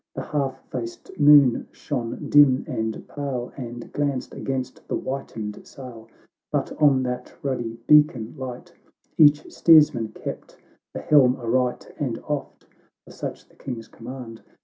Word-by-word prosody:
The - - -4
half 135 -3 -3
faced 115 -2 -6
moon 145 -4 +6
shone 120 -5 -4
dim 145 -3 +5
and 110 -3 -4
pale, 135 -4 -4
And 120 -2 -8
glanced 140 -3 -2
against 130 -2 -5
the - - -2
whitened 115 -6 -5
sail; 125 -5 -11 0.4
But - - -1
on 135 -3 +5
that 125 0 -5
ruddy 120 -4 -3
beacon 150 -7 +4
light 130 -3 -8 0.5
Each 150 -1 +5
steersman 150 -8 +5
kept - - -8 0.4
the - - -4
helm 130 -4 +5
aright, 125 0 -1
And 125 -6 -2
oft, 150 -2 -4 0.4
for - - -14
such - - -7
the - - -25
King's 120 -4 -7
command. 120 -1 -9
130 Hz, 135 wpm, -24 LUFS, 120-145 Hz, 0.5 s, moon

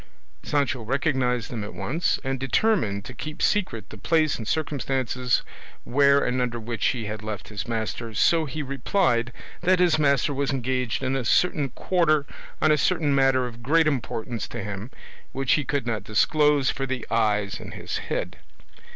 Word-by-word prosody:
Sancho 140 -4 0
recognised 125 -1 0
them 115 -4 -4
at 105 - -8
once, 165 +7 0
and 135 -1 -2
determined 130 - +1
to 125 - -8
keep 155 +5 -7
secret 180 - 0
the 110 - -10
place 155 +6 +2
and 110 - -6
circumstances 130 -4 0 0.4
where 140 +2 +4
and 125 +1 0
under 120 -1 -1
which 115 0 -1
he 120 -4 -1
had 105 0 -5
left 105 -2 -6
his 100 -4 -5
master, 115 0 -3
so 165 +9 +3
he 150 +2 -4
replied 130 -3 +1 0.3
that 185 +1 +4
his 175 -3 +3
master 140 -1 +2
was 140 0 -1
engaged 130 -1 -1
in 130 +1 0
a 135 - -1
certain 145 0 +2
quarter 155 +1 +1 0.3
on 155 - +4
a 150 - +3
certain 160 -5 +2
matter 135 -2 +3
of 120 -1 -8
great 160 +6 +3
importance 120 -5 -2
to 120 -3 -6
him 105 +2 -5 0.4
which 135 -1 0
he 145 - +3
could 135 0 -1
not 110 -4 -2
disclose 145 +6 +3
for 135 -1 -3
the 130 -3 -3
eyes 105 -3 +1
in - - -9
his - - -4
head. - - -3
130 Hz, 175 wpm, -25 LUFS, 115-150 Hz, 0.4 s, where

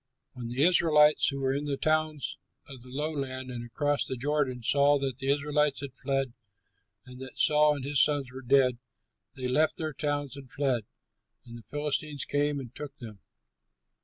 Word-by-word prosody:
When 125 -3 -7
the 125 +4 0
Israelites 155 -3 +5
who 140 -1 -2
were 135 0 +1
in 145 +2 -2
the 140 -2 -2
towns 155 -1 -1 0.3
of 135 -3 -9
the 125 - -13
lowland 135 -2 -4
and 120 -1 -5
across 145 +4 0
the 130 - -4
Jordan 135 -2 -1
saw 140 +4 +4
that 135 -2 -3
the 135 - -4
Israelites 145 0 +1
had 140 -3 -6
fled 135 -1 -2 0.7
and 125 0 -12
that 130 - -9
Saul 150 -1 +4
and 135 -2 -6
his 140 0 +3
sons 145 -3 +2
were 130 +1 -8
dead, 130 -1 +3 0.6
they 130 -1 -3
left 150 +5 +2
their 155 -2 -3
towns 145 -2 -2
and 135 -2 -11
fled, 130 -6 0 0.6
and 120 -1 -11
the 120 - -9
Philistines 145 -1 -2
came 145 0 0
and 125 -3 -9
took 145 -1 -8
them. 110 -5 -10
140 Hz, 180 wpm, -29 LUFS, 130-150 Hz, 0.7 s, Israelites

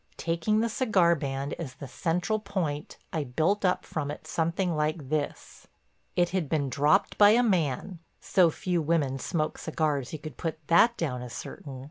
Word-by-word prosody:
Taking 170 +6 +1
the 230 - +1
cigar 215 -7 +3
band 140 -2 -3
as 135 -6 -6
the 140 0 -8
central 175 - -1
point 175 -8 -3 0.2
I 160 - 0
built 160 +11 0
up 180 -1 +1
from 150 -3 -3
it 150 - -7
something 170 +1 0
like 150 -2 -1
this: 150 -1 -4 0.5
It 175 -1 +3
had 180 -6 -1
been 145 -4 0
dropped 150 +10 +2
by 205 -1 +9
a 245 - +4
man—so 175 - +1
few 175 +2 -1
women 150 -4 0
smoke 155 +3 -2
cigars 150 -5 -1
you 155 - -4
could 155 0 -9
put 165 -2 -3
that 230 +8 +5
down 125 -7 -2
as 125 -1 -7
certain. 135 -3 -7
160 Hz, 170 wpm, -28 LUFS, 145-180 Hz, 0.5 s, by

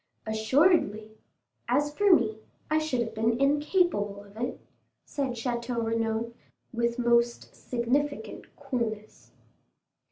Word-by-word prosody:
"Assuredly; 220 - +2 0.6
as 290 +4 +1
for 410 -1 +4
me, 220 -10 +3 0.3
I 310 - +4
should 310 -6 -1
have 225 -1 -3
been 225 +2 +1
incapable 285 - +1
of 200 0 -18
it," 240 +3 -3 0.5
said 275 -3 -2
Château 235 0 -2
Renaud, 225 0 -1 0.4
with 235 0 0
most 235 -1 +1
significant 265 +4 -2
coolness. 235 -7 -4
235 Hz, 105 wpm, -28 LUFS, 225-280 Hz, 0.6 s, for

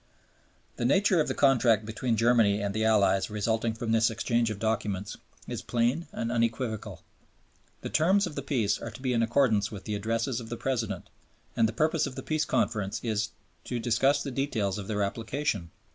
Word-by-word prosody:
" - - -37
The - - -3
nature 190 - +4
of - - -1
the - - -2
Contract 120 -6 +4
between 115 +1 -1
Germany 115 -3 +4
and 100 -1 -2
the 110 +1 0
Allies 105 -3 +3
resulting 110 +2 -1
from 115 0 -3
this 115 0 +4
exchange 115 +1 0
of 110 - -4
documents 105 -2 -2 0.3
is - - -4
plain 120 +8 0
and 115 0 -3
unequivocal. 115 -1 -2 0.8
The - - -5
terms 190 +6 +3
of 175 - -6
the 140 - -4
peace 115 -7 0
are - - -6
to 115 - -11
be 130 -1 +1
in 115 - +2
accordance 115 -3 +2
with 100 -3 -8
the 105 - -4
Addresses 115 +4 -1
of 115 -2 -9
the 120 - -4
President, 115 -8 -2 0.5
and 110 - +3
the - - -3
purpose 155 +6 +1
of 130 - -8
the - - -6
Peace 155 -1 0
Conference 105 -4 0
is 110 -2 -1 0.4
"to 125 - -3
discuss 130 +5 +2
the 140 - -4
details 110 -7 -1
of 100 - -7
their 105 -2 0
application." 110 - -2
115 Hz, 195 wpm, -28 LUFS, 105-130 Hz, 0.8 s, nature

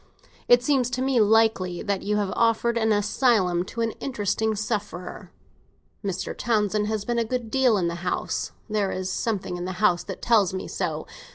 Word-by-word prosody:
It 245 0 +6
seems 260 -3 +2
to 255 - -3
me 265 -2 +2
likely 210 -5 +2
that 200 -2 -1
you 210 +1 -1
would - - +2
have 190 - -4
offered 230 +1 +2
an 220 -1 +2
asylum 205 -4 +2
to 230 - -5
an 225 0 0
interesting 220 -3 -1
sufferer. 205 -4 -4 0.7
Mr. 190 -2 -3
Townsend 210 -2 0
has 215 -1 -2
been 240 -1 0
a - - +2
good 230 -1 -3
deal 260 -5 +3
in 175 -3 0
the 170 - -2
house; 180 - -2 0.2
there 210 -3 0
is 185 0 -3
something 195 -4 -2
in 175 - -4
the 185 - -3
house 180 -2 +2
that - - -6
tells 205 -6 +3
me 185 - -4
so. - - -3
215 Hz, 190 wpm, -25 LUFS, 190-235 Hz, 0.7 s, It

